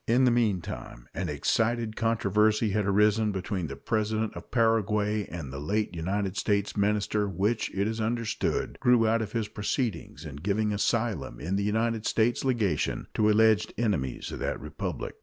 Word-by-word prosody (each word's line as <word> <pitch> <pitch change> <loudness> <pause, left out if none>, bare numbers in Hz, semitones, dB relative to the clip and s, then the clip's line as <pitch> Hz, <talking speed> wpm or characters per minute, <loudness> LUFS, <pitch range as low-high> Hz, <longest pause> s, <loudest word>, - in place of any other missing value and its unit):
In 120 +3 +4
the 125 - +5
meantime 95 - -2
an - - -3
excited 115 -1 0
controversy 110 -1 +2
had 105 0 0
arisen 105 +2 +3
between 95 -2 -3
the 70 - -6
President 110 +7 -1
of - - -9
Paraguay 105 -3 +1
and 80 -6 -7
the 70 - -5
late 105 +8 -1
United 95 +3 -2
States 100 -1 0
minister, 105 0 +1
which, 105 +5 0
it 100 +2 0
is 110 0 -2
understood, 115 0 -1
grew 120 -2 +4
out 115 +1 +2
of 105 -1 -5
his 115 -3 -1
proceedings 105 - -3
in 70 -2 -7
giving 105 +6 0
asylum 105 - -1
in 90 +5 -2
the 100 - 0
United 110 +1 0
States 115 +2 +1
legation 110 - 0
to 105 0 +3
alleged 110 0 +3
enemies 90 - -1
of - - -6
that - - -2
Republic. - - -5
105 Hz, 165 wpm, -28 LUFS, 100-115 Hz, -, the